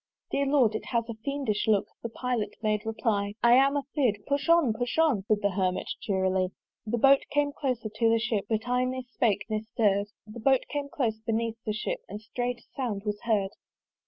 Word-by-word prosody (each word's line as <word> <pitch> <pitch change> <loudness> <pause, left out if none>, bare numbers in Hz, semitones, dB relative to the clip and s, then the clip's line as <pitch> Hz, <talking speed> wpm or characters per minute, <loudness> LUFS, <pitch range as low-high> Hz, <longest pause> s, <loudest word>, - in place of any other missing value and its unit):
"Dear 280 0 +1
Lord! 265 -6 +4
it 220 - -4
has 235 -2 -1
a - - -2
fiendish 225 -2 -2
look" 210 -2 +3 0.2
(The 235 - -4
Pilot 240 -1 -2
made 215 0 0
reply) 210 -2 -1
"I 235 0 +7
am 275 +3 +5
a 285 - -1
fear'd. 255 -9 +2
"Push 280 +3 -1
on, 335 -9 +5
push 245 +5 -3
on!" 310 -11 +3
Said 210 -1 +1
the 200 - +2
Hermit 185 -1 -1
cheerily. 190 -2 +1 0.4
The 235 +3 0
Boat 270 +3 +6
came 290 0 +1
closer 255 -6 -2
to 220 +2 +1
the 230 - +4
Ship, 220 -2 0
But 220 +1 -1
I 250 +1 +2
ne 255 0 -2
spake 220 -5 0
ne 215 -1 -1
stirr'd! 210 -3 +1 0.2
The 215 +2 -10
Boat 265 +3 +3
came 285 -1 -3
close 230 -6 -1
beneath 225 0 -2
the 215 - +1
Ship, - - -3
And 210 - -6
strait 245 +3 -3
a - - -23
sound 230 -7 -2
was 210 0 -2
heard! 205 -4 +1
230 Hz, 210 wpm, -28 LUFS, 210-260 Hz, 0.4 s, I